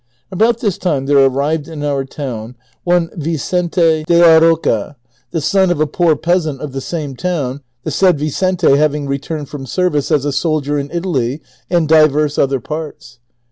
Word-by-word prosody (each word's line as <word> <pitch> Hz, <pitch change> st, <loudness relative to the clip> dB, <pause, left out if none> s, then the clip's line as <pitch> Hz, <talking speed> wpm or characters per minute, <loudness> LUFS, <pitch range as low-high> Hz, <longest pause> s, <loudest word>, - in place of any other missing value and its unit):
About 225 Hz, +5 st, +1 dB
this 205 Hz, -6 st, -1 dB
time 150 Hz, -7 st, -1 dB
tiiere 140 Hz, -1 st, +4 dB
arrived 145 Hz, +3 st, -1 dB
in 155 Hz, -3 st, -7 dB
our 140 Hz, -2 st, -1 dB
town 125 Hz, -4 st, -6 dB, 0.3 s
one 175 Hz, -1 st, +1 dB
Vicente 165 Hz, +1 st, 0 dB
de 170 Hz, -, +4 dB
la 165 Hz, -2 st, +7 dB
Roca, 160 Hz, -7 st, +1 dB, 0.3 s
the 165 Hz, -, -2 dB
son 190 Hz, +5 st, +2 dB
of 175 Hz, -, 0 dB
a 155 Hz, -, +3 dB
po<n 160 Hz, 0 st, +1 dB
peasant 165 Hz, -5 st, 0 dB
of 150 Hz, -1 st, -6 dB
the 135 Hz, +1 st, -5 dB
same 145 Hz, -2 st, -5 dB
town, 145 Hz, -5 st, -3 dB, 0.2 s
the 155 Hz, -, -3 dB
said 180 Hz, +2 st, +3 dB
Vicente 160 Hz, +1 st, +1 dB
having 150 Hz, -1 st, +1 dB
returned 140 Hz, +2 st, -4 dB
from 135 Hz, -1 st, -8 dB
service 175 Hz, -3 st, 0 dB
as 150 Hz, -3 st, +1 dB
a 145 Hz, -, -1 dB
soldier 150 Hz, -1 st, 0 dB
in 140 Hz, 0 st, -5 dB
Italy 155 Hz, -7 st, -2 dB, 0.3 s
and 170 Hz, -3 st, +1 dB
divers 155 Hz, -1 st, +3 dB
other 135 Hz, -1 st, +1 dB
parts. 145 Hz, -4 st, -7 dB
155 Hz, 175 wpm, -16 LUFS, 140-170 Hz, 0.3 s, la